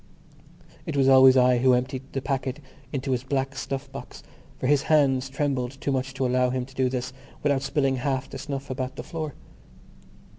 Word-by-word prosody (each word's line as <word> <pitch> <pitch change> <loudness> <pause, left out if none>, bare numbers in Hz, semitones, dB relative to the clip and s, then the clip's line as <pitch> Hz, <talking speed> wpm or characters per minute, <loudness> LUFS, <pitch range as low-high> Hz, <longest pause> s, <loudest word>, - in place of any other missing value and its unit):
It 155 -3 -2
was 135 -1 +4
always 130 0 +8
I 125 -1 +5
who 130 +1 +5
emptied 130 +2 -3
the 135 - -3
packet 135 0 -2 0.3
into 135 -1 -2
his 125 -1 0
black 135 0 -2
snuff 135 -1 -4
box - - -9 0.3
for - - -4
his 140 +1 +4
hands 140 -4 +2
trembled 135 -2 -2
too 140 - -1
much 130 0 -2
to 135 -1 0
allow 125 0 +2
him 130 0 -2
to 135 - -17
do 130 -1 +1
this 130 0 -3 0.3
without 140 -2 +2
spilling 135 -1 0
half 135 +1 -1
the - - -8
snuff 140 -2 -5
about 130 0 -3
the - - -6
floor. 155 -4 -5
135 Hz, 190 wpm, -26 LUFS, 130-140 Hz, 0.3 s, always